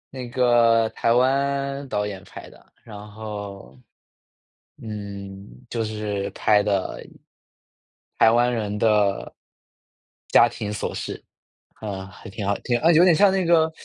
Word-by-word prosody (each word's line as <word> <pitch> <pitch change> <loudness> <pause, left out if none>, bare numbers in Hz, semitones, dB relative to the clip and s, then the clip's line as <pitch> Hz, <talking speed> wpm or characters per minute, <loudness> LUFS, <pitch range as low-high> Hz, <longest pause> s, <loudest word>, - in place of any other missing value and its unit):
那 125 -2 -6
个 120 -3 +3
台 115 - 0
湾 140 +2 0
导 105 0 -1
演 95 -3 -7
拍 - - -11
的。 - - -19
然 110 -3 -11 0.2
后， 105 -2 -8 1.1
嗯， 100 -2 -8 0.2
就 115 -2 -2
是 105 -2 -3
拍 105 -1 +2
的 100 -2 -2 1.1
台 110 - +6
湾 120 +1 +3
人 105 -3 -3
的 105 -3 +1 0.9
家 120 - +6
庭 105 -3 -5
琐 105 - -3
事。 - - -6 0.5
啊， 95 -3 -6
还 95 0 -12
挺 100 +1 -6
好 100 - +2
挺 120 -1 +1
啊， 165 +6 +3
有 165 +3 +6
点 180 -2 +5
像 200 +4 +5
那 190 -1 0
个 160 -1 +3
110 Hz, 145 characters per minute, -23 LUFS, 100-130 Hz, 1.1 s, 台